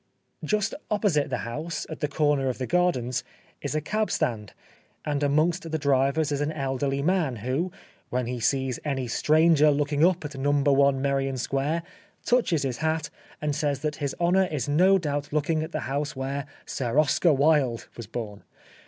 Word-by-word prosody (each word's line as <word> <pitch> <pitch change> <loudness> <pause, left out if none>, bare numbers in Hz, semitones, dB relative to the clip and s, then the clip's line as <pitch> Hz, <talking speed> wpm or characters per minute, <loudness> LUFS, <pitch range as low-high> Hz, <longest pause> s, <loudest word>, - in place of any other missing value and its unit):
Just 210 -2 0 0.2
opposite 195 -9 +1
the 125 - -1
house, 155 +8 -4
at 160 - -7
the 150 - 0
corner 145 -2 +1
of 125 - -3
the 130 - -3
gardens, 130 -8 +1 0.4
is - - -3
a 155 - +1
cab 215 +7 -1
stand, 105 -5 -1 0.5
and 145 -1 -1
amongst 160 +5 +1
the 160 - -1
drivers 140 +1 +1
is 145 0 -1
an 145 +1 0
elderly 135 -1 -1
man 170 -6 +1
who, 130 - -2 0.4
when 125 0 -1
he 125 +1 -4
sees 130 +2 0
any 135 -4 -2
stranger 155 +4 +4
looking 145 +1 +1
up 180 -2 +3
at 150 -1 -6
No. 140 0 +3
i - - +4
Merrion 135 0 -1
Square, 140 +6 -1 0.4
touches 225 - +2
his 130 -3 -2
hat 160 -1 -1 0.3
and 150 -1 0
says 145 -2 -1
that 150 -1 -2
his 140 -2 -3
honour 180 +2 +3
is 150 -8 -3
no 180 +7 +5
doubt 145 -4 -3
looking 155 +1 +1
at 160 +2 -5
the 155 - -3
house 145 +3 -3
where 135 +2 -3
" - - -28
Sir 125 0 -2
Oscar 155 +3 +4
Wilde 140 -4 +2
" - - -33
was 115 -3 -8
born. 105 -3 -6
145 Hz, 185 wpm, -26 LUFS, 135-160 Hz, 0.5 s, no